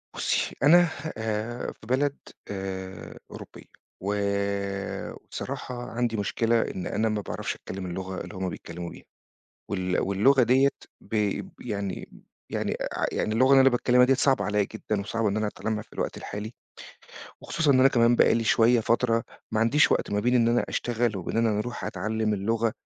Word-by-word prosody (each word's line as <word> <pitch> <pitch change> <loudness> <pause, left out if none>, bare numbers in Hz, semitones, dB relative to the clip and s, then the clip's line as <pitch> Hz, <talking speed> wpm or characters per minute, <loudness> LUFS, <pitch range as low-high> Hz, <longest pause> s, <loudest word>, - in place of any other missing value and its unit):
بُصّي - - 0
أنا 175 +3 +7 0.3
آآ 110 +2 -3
في 110 - -16
بلد 140 +3 +1 0.4
آآ 95 -1 -6
أوروبية، - - -10 0.4
و 100 +2 -1 1.0
وبصراحة 120 -1 -6
عندي 115 -1 -1
مشكلة 115 +3 +1
إن 95 - -4
أنا 110 +1 0
ما 105 -1 -1
باعرفش - - -4
أتكلّم 95 0 -7
اللغة 95 +1 -5
اللي 105 - -8
هُم 95 -1 -2
بيتكلموا 85 0 -7
بيها، - - -12 0.7
وال 95 -2 0
واللغة 115 +8 +4
ديّة 130 +4 +5 0.3
ب - - -9 0.5
يعني 100 -2 -4 0.4
يعني - - -1
أع - - -2
يعني 110 - -1
اللغة 130 +4 +4
اللي 135 -1 +8
أنا 135 - +7
باتكلّمها 125 0 +4
ديّة 135 - +4
صعبة 135 0 +2
عليَّ 105 0 +1
جدًا، 105 0 -3
وصعبة 115 +2 -1
إن 100 - -1
أنا 110 0 0
أتعلّمها 110 +1 -3
في - - -27
الوقت - - -3
الحالي، 105 +3 -6 0.9
وخصوصًا 160 -3 0
إن 130 - +4
أنا 135 - +7
كمان 120 -2 +4
بقى - - +5
لي 115 0 0
شوية، 115 +2 +4
فترة 115 0 +1 0.3
ما 110 - 0
عنديش 130 +7 +4
وقت - - 0
ما 105 - +1
بين 125 +4 +2
إن 115 -2 +4
أنا 120 +1 +2
أشتغل 120 -2 -1
وبين 95 +3 -4
إن 115 0 +3
أنا 105 -2 +1
أروح 120 +3 -4
أتعلّم 110 +3 -1
اللغة، 115 +3 0
110 Hz, 175 wpm, -26 LUFS, 105-120 Hz, 1.0 s, اللي